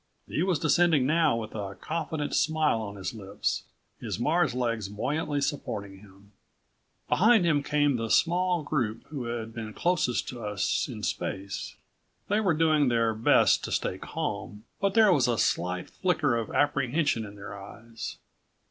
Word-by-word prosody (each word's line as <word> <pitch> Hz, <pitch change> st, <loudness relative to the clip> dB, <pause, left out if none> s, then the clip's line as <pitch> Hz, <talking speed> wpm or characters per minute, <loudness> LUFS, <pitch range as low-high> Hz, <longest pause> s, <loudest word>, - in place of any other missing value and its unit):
He -, -, -2 dB
was 180 Hz, -2 st, +2 dB
descending 160 Hz, -2 st, +3 dB
now 160 Hz, -3 st, +3 dB
with 110 Hz, -1 st, -6 dB
a 100 Hz, -2 st, -5 dB
confident 155 Hz, 0 st, -3 dB
smile 155 Hz, -6 st, +2 dB
on 100 Hz, -2 st, -6 dB
his 95 Hz, 0 st, -5 dB
lips, 100 Hz, -3 st, -3 dB, 0.3 s
his 105 Hz, -3 st, -4 dB
Mars' 155 Hz, +2 st, +2 dB
legs 115 Hz, -5 st, -1 dB
buoyantly 145 Hz, +7 st, -2 dB
supporting 100 Hz, -9 st, -3 dB
him. 100 Hz, 0 st, -18 dB, 0.8 s
Behind 220 Hz, -1 st, +4 dB
him 150 Hz, -4 st, +3 dB
came 145 Hz, -2 st, +1 dB
the 115 Hz, -1 st, -3 dB
small 175 Hz, +2 st, +2 dB
group 120 Hz, -7 st, -2 dB
who 140 Hz, -5 st, -5 dB
had 115 Hz, -1 st, -4 dB
been 110 Hz, -2 st, -6 dB
closest 170 Hz, -9 st, +1 dB
to 120 Hz, -3 st, -7 dB
us 105 Hz, -2 st, 0 dB
in -, -, -7 dB
space. 100 Hz, 0 st, -4 dB, 0.5 s
They 205 Hz, +2 st, +3 dB
were 190 Hz, -7 st, +2 dB
doing 155 Hz, -3 st, +3 dB
their 115 Hz, -2 st, +2 dB
best 110 Hz, +1 st, +4 dB
to -, -, -6 dB
stay -, -, -1 dB
calm, 105 Hz, 0 st, -5 dB, 0.2 s
but 195 Hz, 0 st, 0 dB
there 215 Hz, -4 st, +6 dB
was 130 Hz, -6 st, +3 dB
a 120 Hz, -2 st, +1 dB
slight 90 Hz, -1 st, 0 dB
flicker 160 Hz, -8 st, +1 dB
of 115 Hz, -2 st, -2 dB
apprehension 145 Hz, -2 st, +1 dB
in 105 Hz, -1 st, -9 dB
their 100 Hz, 0 st, -8 dB
eyes. 110 Hz, +2 st, -8 dB
125 Hz, 160 wpm, -28 LUFS, 110-155 Hz, 0.8 s, there